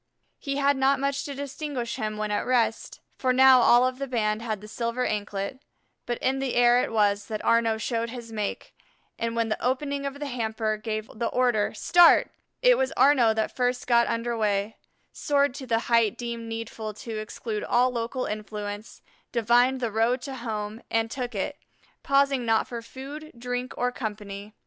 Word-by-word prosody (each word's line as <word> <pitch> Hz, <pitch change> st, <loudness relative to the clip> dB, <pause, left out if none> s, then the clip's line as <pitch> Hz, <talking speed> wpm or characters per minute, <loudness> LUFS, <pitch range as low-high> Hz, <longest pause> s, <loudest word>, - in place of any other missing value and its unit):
He 275 Hz, -1 st, -3 dB
had 280 Hz, 0 st, +2 dB
not 270 Hz, +1 st, +3 dB
much 275 Hz, 0 st, -1 dB
to 280 Hz, -, -5 dB
distinguish 280 Hz, -3 st, -4 dB
him 215 Hz, 0 st, -3 dB
when 215 Hz, 0 st, -2 dB
at 205 Hz, -, 0 dB
rest, 230 Hz, -3 st, 0 dB, 0.2 s
for 255 Hz, -, +2 dB
now 260 Hz, 0 st, +7 dB
all 240 Hz, +1 st, +6 dB
of 255 Hz, 0 st, -2 dB
the 275 Hz, -, -3 dB
band 215 Hz, -3 st, 0 dB
had 220 Hz, -3 st, -3 dB
the 210 Hz, -, -11 dB
silver 235 Hz, +3 st, -2 dB
anklet, 205 Hz, +4 st, -3 dB, 0.5 s
but 240 Hz, -1 st, -1 dB
in 265 Hz, +1 st, +1 dB
the 270 Hz, -2 st, -2 dB
air 245 Hz, 0 st, +5 dB
it -, -, -4 dB
was 205 Hz, -2 st, +1 dB
that 215 Hz, -1 st, -4 dB
Arnaux 230 Hz, -1 st, +3 dB
showed 230 Hz, +1 st, -2 dB
his 235 Hz, -1 st, -8 dB
make, 210 Hz, -2 st, -4 dB, 0.5 s
and 230 Hz, 0 st, -2 dB
when 230 Hz, -1 st, 0 dB
the 215 Hz, -, -3 dB
opening 280 Hz, +2 st, -1 dB
of 275 Hz, +1 st, -7 dB
the 295 Hz, -, -4 dB
hamper 220 Hz, -4 st, -2 dB
gave 215 Hz, 0 st, -4 dB
the 230 Hz, +1 st, -2 dB
order 245 Hz, -5 st, +1 dB
"Start," 350 Hz, +9 st, +5 dB, 0.3 s
it -, -, +6 dB
was -, -, +1 dB
Arnaux 260 Hz, -5 st, +5 dB
that 220 Hz, 0 st, -1 dB
first 250 Hz, 0 st, 0 dB
got 235 Hz, -1 st, +4 dB
under 235 Hz, +1 st, -1 dB
way, 210 Hz, -1 st, 0 dB, 0.4 s
soared 285 Hz, -2 st, +1 dB
to 265 Hz, -1 st, -8 dB
the 230 Hz, -1 st, +1 dB
height 230 Hz, -3 st, +3 dB
deemed 235 Hz, -1 st, -5 dB
needful 225 Hz, -1 st, -5 dB
to 225 Hz, -1 st, -6 dB
exclude 215 Hz, 0 st, -5 dB
all 250 Hz, +1 st, +2 dB
local 240 Hz, +2 st, -3 dB
influence, 210 Hz, 0 st, -6 dB, 0.3 s
divined 245 Hz, +3 st, +3 dB
the 235 Hz, -2 st, -1 dB
road 225 Hz, +4 st, +2 dB
to 275 Hz, -, -5 dB
home, 220 Hz, -2 st, -5 dB
and 225 Hz, 0 st, 0 dB
took 245 Hz, -3 st, -4 dB
it, 285 Hz, +10 st, -3 dB, 0.4 s
pausing 275 Hz, -2 st, +2 dB
not 225 Hz, -1 st, +2 dB
for 235 Hz, -1 st, -6 dB
food, 275 Hz, +6 st, -9 dB
drink, 245 Hz, +1 st, -4 dB
or 245 Hz, 0 st, 0 dB
company. 210 Hz, -3 st, -6 dB
235 Hz, 185 wpm, -26 LUFS, 220-260 Hz, 0.5 s, now